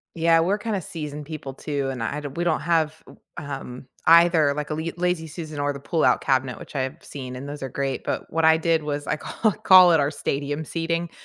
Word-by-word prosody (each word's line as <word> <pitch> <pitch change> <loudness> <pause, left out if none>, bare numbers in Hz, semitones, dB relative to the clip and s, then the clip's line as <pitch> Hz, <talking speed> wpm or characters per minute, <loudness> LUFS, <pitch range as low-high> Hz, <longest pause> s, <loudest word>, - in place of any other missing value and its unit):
Yeah. 165 0 +4
We're 190 +5 +1
kinda 210 -2 -2
season 150 -3 -6
people 140 -3 -7
too, 140 -1 -3
and 125 -3 -5
I 140 +6 -2
do 145 - -6
we 170 +6 -3
don't 165 -3 +1
have 160 -1 0
w - - -16 0.2
um, 135 -3 -7 0.2
either 165 -3 +6
like 150 +1 -4
a - - -1
li 160 +2 -3
lazy 180 -2 -1
Susan 155 -2 -7
or 145 0 0
the 140 - -8
pullout 160 +3 +2
cabinet, 130 -3 0
which - - -12
I 140 - -1
have 130 0 -3
seen, 130 -3 -7
and 140 +3 -7
those 145 -1 -7
are 135 - -3
great. 135 +1 -3
But - - -3
what 165 0 +1
I 160 0 +6
did 165 -1 +1
was 145 -1 -4
I - - 0
ca 215 +8 -1
call 185 -2 +8
it 160 - +4
our 140 0 +1
stadium 145 +1 -3
seating 165 +2 -2
150 Hz, 235 wpm, -24 LUFS, 140-165 Hz, 0.2 s, call